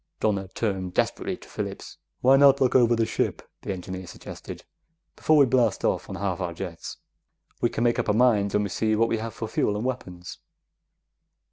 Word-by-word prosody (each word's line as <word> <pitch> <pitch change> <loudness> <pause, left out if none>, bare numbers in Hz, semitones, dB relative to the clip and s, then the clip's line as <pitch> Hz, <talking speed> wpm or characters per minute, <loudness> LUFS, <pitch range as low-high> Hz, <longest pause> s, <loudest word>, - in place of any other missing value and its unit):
Donna 100 -3 0
turned 95 -3 -3
desperately - - -1
to - - -16
Phillips. - - -6 0.2
"Why 130 +2 +6
not 140 0 +6
look 130 -2 +2
over 120 -2 +5
the 115 0 +1
ship," - - -2 0.2
the - - -4
engineer 95 0 -6
suggested, 90 - -9 0.5
"before 155 - +3
we 140 - +7
blast 120 -5 +1
off - - 0
on - - -5
half 95 -3 -2
our 85 -2 -2
jets? 85 -3 -7 0.6
We - - +3
can 115 - -2
make 120 -1 +2
up - - -1
our 105 - +3
minds 110 -5 +3
when 105 - +2
we 100 - -3
see 110 +4 0
what 115 +2 +2
we 115 - 0
have 115 0 -6
for 115 - -4
fuel 105 - 0
and 105 +3 -3
weapons." 90 -9 -5
110 Hz, 200 wpm, -25 LUFS, 95-120 Hz, 0.6 s, we